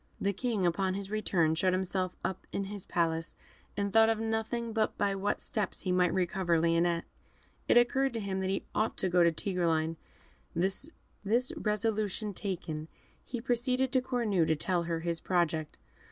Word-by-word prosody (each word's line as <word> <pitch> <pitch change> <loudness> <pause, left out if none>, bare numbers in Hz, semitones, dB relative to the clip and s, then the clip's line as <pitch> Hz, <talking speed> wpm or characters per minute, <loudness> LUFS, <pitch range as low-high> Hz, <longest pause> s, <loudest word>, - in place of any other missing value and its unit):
The 200 0 0
King, 210 -2 -1
upon 185 +2 +1
his 200 0 -5
return, 180 -7 +2
shut 185 +3 +2
himself 185 0 -1
up 190 - -3
in 200 - -1
his 200 -1 -7
palace, 165 -1 0 0.4
and 200 -1 -1
thought 225 0 +6
of 225 -1 +1
nothing 225 +1 -2
but 220 -1 0
by 200 - +1
what 195 +1 -1
steps 210 -2 -2
he 185 - 0
might 180 -1 +3
recover 180 -2 +1
Lionette. 170 +1 +2 0.6
It - - +5
occurred 265 +2 +3
to - - -1
him 195 -2 -2
he 190 +1 -1
ought 215 - 0
to 190 - 0
go 175 0 +4
to 170 - +5
Tigreline. 165 -2 0 0.6
This 190 - -1 0.7
resolution 210 -1 -1
taken, 165 -6 -3 0.4
he 245 - -5
proceeded 250 +2 0
to 260 - +3
Cornue 225 -10 +1
to 160 - +3
tell 170 +3 0
her 165 -1 -2
his 170 0 -1
project. 165 -4 0
190 Hz, 170 wpm, -31 LUFS, 170-215 Hz, 0.7 s, thought